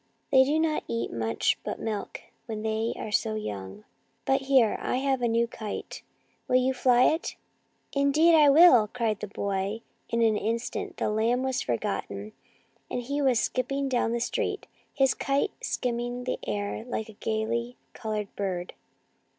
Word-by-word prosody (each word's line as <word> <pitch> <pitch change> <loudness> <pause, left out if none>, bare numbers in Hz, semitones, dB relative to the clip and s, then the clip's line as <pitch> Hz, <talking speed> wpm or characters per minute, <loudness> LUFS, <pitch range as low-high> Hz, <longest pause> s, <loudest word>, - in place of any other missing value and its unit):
" - - -45
They 265 -1 +7
do 290 +4 +1
not 315 -1 +1
eat 115 0 -2
much 115 0 0
but - - -4
milk 215 -2 -4 0.3
when 220 -2 -4
they 220 +1 -1
are 215 - -5
so 215 0 +1
young. 100 - -6 0.4
But 270 0 +2
here, 265 -5 +4
I - - -1
have 265 -1 0
a 240 - +2
new 230 +1 +2
kite; 215 -2 -6 0.5
will 250 - +1
you 255 +1 +3
fly 250 -1 +4
it? 315 +5 +1 0.2
" - - -44
" - - -44
Indeed 290 +4 +4
I 300 -3 +7
will," 275 -7 +7
cried 225 -2 -1
the 210 - -5
boy, 200 +2 -2 0.3
and 235 0 +2
in 220 -2 +3
an - - -4
instant 245 - -3
the - - 0
lamb 230 +4 +1
was 260 -1 0
forgotten, 100 -3 -3 0.6
and 245 - -3
he 285 +4 -2
was 260 -4 +3
skipping 275 +3 -1
down 245 -3 +1
the 235 - 0
street, 240 - -2 0.3
his 270 -1 +3
kite 275 0 0
skimming 245 0 -2
the 255 - -2
air 205 +1 -2
like 230 -2 -4
a 220 - -11
gaily 230 +3 -2 0.2
coloured 215 -2 -4
bird. 185 -3 -3
235 Hz, 175 wpm, -27 LUFS, 215-265 Hz, 0.6 s, They